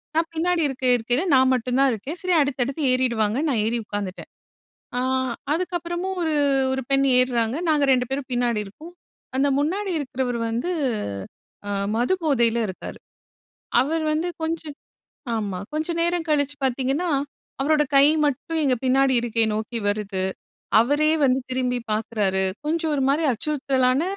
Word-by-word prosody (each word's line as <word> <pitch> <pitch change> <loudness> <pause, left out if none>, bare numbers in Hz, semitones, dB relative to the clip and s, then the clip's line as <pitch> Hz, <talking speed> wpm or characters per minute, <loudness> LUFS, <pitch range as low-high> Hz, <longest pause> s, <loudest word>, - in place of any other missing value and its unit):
நான் 325 0 +1
பின்னாடி 345 +1 +1
இருக்க 260 -1 -4
இருக்கைல, 245 +5 0
நான் 260 0 +5
மட்டும் 250 +1 -1
தான் 275 -1 +5
இருக்கேன். 265 - -5
சரி 365 -1 0
அடுத்தடுத்து 275 +1 -1
ஏறிடுவாங்கன் 250 +2 +1
நான் 230 -6 +1
ஏறி 235 +2 0
உட்காந்துட்டேன். 205 -3 -5 0.7
ஆ - - +1 0.5
அதுக்கப்புறமும் 350 +2 -3
ஒரு, 320 -2 0 0.4
ஒரு 265 0 -1
பெண் 275 0 +3
ஏர்றாங்க, 245 0 +1
நாங்க 295 -2 +3
2 250 -1 +3
பேரும் 270 0 -3
பின்னாடி 240 -3 +1
இருக்கோம். 310 - -12 0.5
அந்த 280 +1 +3
முன்னாடி 380 +6 -1
இருக்கிறவரு 255 -3 -2
வந்து 245 +11 -2 1.0
அ - - -2 0.3
மது 250 +11 +2
போதையில 235 -6 +2
இருக்காரு. 185 - -7 0.8
அவரு 315 +4 -1
வந்து 335 +3 -1
கொஞ்சம் 320 -2 -3 0.6
ஆமா. 200 -4 -3
கொஞ்சம் 320 +2 -2
நேரம் 345 -1 0
கழிச்சு 290 -1 +1
பார்த்தீங்கன்னா, 270 +7 0 0.5
அவரோட 300 +1 +3
கை 275 +1 +7 0.2
மட்டும் 315 +4 -2
எங்க 260 -2 +3
பின்னாடி 265 0 +3
இருக்கை 230 -1 +1
நோக்கி 220 +2 -3
வருது. 205 -2 -2 0.6
அவரே 290 +5 +2
வந்து 260 0 +3
திரும்பி 250 -1 0
பார்க்குறாரு. 210 -3 0 0.2
கொஞ்சம் 320 0 0
ஒரு 275 - 0
மாரி 305 +4 +2
அச்சுறுத்தலான 265 +1 +1
265 Hz, 140 wpm, -23 LUFS, 240-315 Hz, 1.0 s, கை